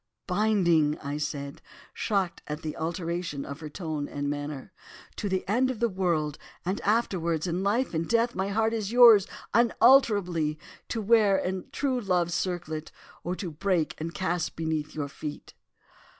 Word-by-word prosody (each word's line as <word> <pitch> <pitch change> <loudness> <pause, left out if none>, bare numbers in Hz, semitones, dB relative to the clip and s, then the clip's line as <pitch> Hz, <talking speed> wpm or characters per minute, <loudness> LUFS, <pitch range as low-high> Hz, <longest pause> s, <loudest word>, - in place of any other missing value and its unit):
"'Binding,' 180 -7 +2 0.2
said 140 -1 -4
I, - - -26 0.2
shocked 195 -5 -1
at 150 +1 -5
the 155 -1 -4
alteration 170 -2 -3
of 140 +1 -7
her 155 -2 -7
tone 155 -3 -4
and 145 0 -4
manner. 145 +3 -5 0.4
'To 205 - -3
the 190 -1 -1
end 250 +6 +2
of 255 -4 -4
the 235 - +3
world, 170 -6 -1 0.3
and 190 +3 -1
afterwards, 180 -8 0
in 175 +1 -1
life, 215 +5 +1
in 165 0 0
death, 235 +3 +2
my 190 0 -1
heart 220 +2 +1
is 215 -2 -2
yours 230 -5 +8 0.3
unalterably—to 205 - +2
wear 210 -2 +5
in 185 -1 -3
true 265 -3 0
love's 180 -4 +1
circlet 175 -3 -3 0.3
or 175 +2 -2
to 180 -3 -5
break 175 0 0
and 165 +1 -5
cast 175 -2 -1
beneath 160 -2 -2
your 145 -2 -2
feet. 150 +1 -8
180 Hz, 155 wpm, -27 LUFS, 155-205 Hz, 0.4 s, yours